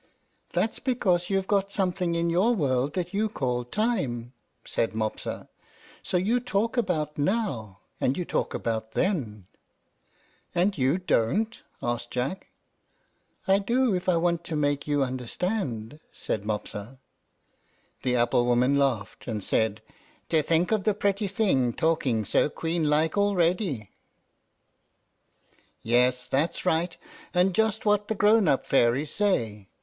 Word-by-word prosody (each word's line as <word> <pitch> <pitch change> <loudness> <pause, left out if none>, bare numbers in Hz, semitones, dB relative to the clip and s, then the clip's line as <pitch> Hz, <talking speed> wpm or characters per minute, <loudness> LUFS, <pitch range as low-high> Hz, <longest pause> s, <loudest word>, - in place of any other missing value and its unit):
"That's 220 - 0
because 185 -9 +1
you've 195 -1 +1
got 200 0 +1
something 180 -3 0
in 170 0 +1
your 205 +8 +3
world 135 - 0
that 180 0 -2
you 215 +2 +1
call 125 - -1
TIME," 130 - -1 0.3
said 115 - -1
Mopsa; 110 -1 -3 0.5
"so - - -1
you 215 +7 +2
talk 230 -2 -1
about 155 - -1
NOW, 145 - -1 0.2
and 130 - +1
you 180 - -2
talk - - -1
about 110 -1 -3
THEN." 120 - -1 1.1
"And 190 +3 +2 0.3
don't 210 - +1
you?" - - -10
asked 120 0 -2
Jack. 130 +10 -3 1.0
"I 195 +1 +5
do 235 +3 +2
if 180 0 -1
I 175 - +4
want 170 0 +1
to 160 - -4
make 145 -1 0
you 145 -1 +2
understand," 130 - -3
said 105 -1 -4
Mopsa. 105 +3 -4 1.0
The 125 0 0
apple 120 0 +2
woman 125 +3 +3
laughed, 120 -7 -1
and 110 -4 -3
said, 110 +1 0 0.5
"To 160 -2 +4
think 165 +5 +1
of 215 -3 +2
the 215 -1 +2
pretty 200 0 0
thing 185 - +1
talking 140 -9 +1
so 145 - +2
queen 165 0 -1
like 155 +5 +2
already! 175 - +1 1.9
Yes, 125 +2 +2
that's 140 +9 -1
right, 170 0 +1 0.4
and 180 +1 +3
just 220 +2 +1
what 210 0 +2
the 220 - -1
grown 210 -1 +4
up 135 - +2
fairies 135 +3 +2
say. 115 - 0
160 Hz, 135 wpm, -27 LUFS, 125-195 Hz, 1.9 s, I